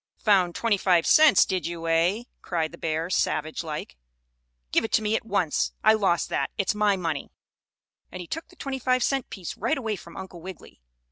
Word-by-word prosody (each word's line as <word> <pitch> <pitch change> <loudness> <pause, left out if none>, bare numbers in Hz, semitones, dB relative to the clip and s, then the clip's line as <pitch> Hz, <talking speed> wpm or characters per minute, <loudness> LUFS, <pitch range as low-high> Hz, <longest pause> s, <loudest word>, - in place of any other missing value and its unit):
"Found 185 -5 +2
twenty 230 -3 +1
five 180 -3 +3
cents, 305 -11 +6
did 185 -3 -2
you, 170 -1 -5
eh?" 170 +7 +2 0.2
cried 165 -3 -2
the 170 - -11
bear, 160 +1 -2
savage 155 -2 -1
like. 150 - -6 0.7
"Give - - +3
it 225 - -4
to 220 - +3
me 215 +1 +1
at 225 - -3
once! 185 -8 0
I 215 - +6
lost 190 -6 +1
that, - - -1
it's 195 - +1
my 210 -1 +2
money!" 165 -5 -3 0.8
And 185 - -7
he 180 - -6
took 325 - -6
the 360 - -20
twenty 275 -5 -5
five 255 0 +1
cent 270 -3 -1
piece 185 -4 -7
right 230 +6 -1
away 220 -5 -2
from 170 -3 -12
Uncle 185 -3 -9
Wiggily. 185 - -11
190 Hz, 200 wpm, -26 LUFS, 165-220 Hz, 0.8 s, cents